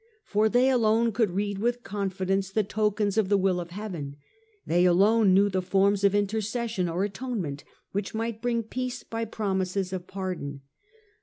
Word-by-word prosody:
For 215 +1 +2
they 250 +3 +4
alone 230 -1 +3
could 220 -1 +1
read 200 +2 -2
with 240 +2 -1
confidence 195 -1 -1
the 215 +2 +1
tokens 210 0 0
of 200 -3 +1
the 200 - +4
will 185 -2 +1
of 175 -1 -6
heaven, 175 -8 -6 0.5
they 175 +2 +2
alone 195 +2 +5
knew 200 +1 +5
the 190 -2 0
forms 195 +2 +2
of 200 0 +4
intercession 215 -1 -1
or 175 +3 -1
atonement 200 - -4 0.3
which 200 +2 -3
might 225 0 -3
bring 235 -1 0
peace 250 +3 -4
by 225 0 -4
promises 190 -3 -2
of 180 -1 -5
pardon. 180 -8 -5
200 Hz, 165 wpm, -27 LUFS, 185-220 Hz, 0.5 s, alone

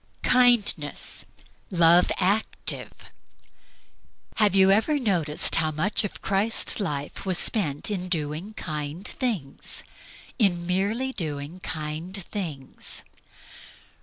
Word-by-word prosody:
Kindness. 240 -12 +2 0.4
Love 170 0 +5
active. 200 +4 0 1.5
Have 210 -3 +4
you 190 0 +6
ever 225 +10 +3
noticed 175 - +2
how 160 -1 +2
much 155 +9 -1
of 205 - -6
Christ's 200 +4 +2
life 145 -8 -3
was 185 -2 +1
spent 155 -4 +1
in 185 -2 -3
doing 160 +5 -3
kind 155 +3 -4
things 210 - -2 0.6
in 175 -6 +2
merely 205 +9 0
doing 155 - -5
kind 160 +3 -4
things? 170 -8 -5
180 Hz, 100 wpm, -26 LUFS, 155-205 Hz, 1.5 s, you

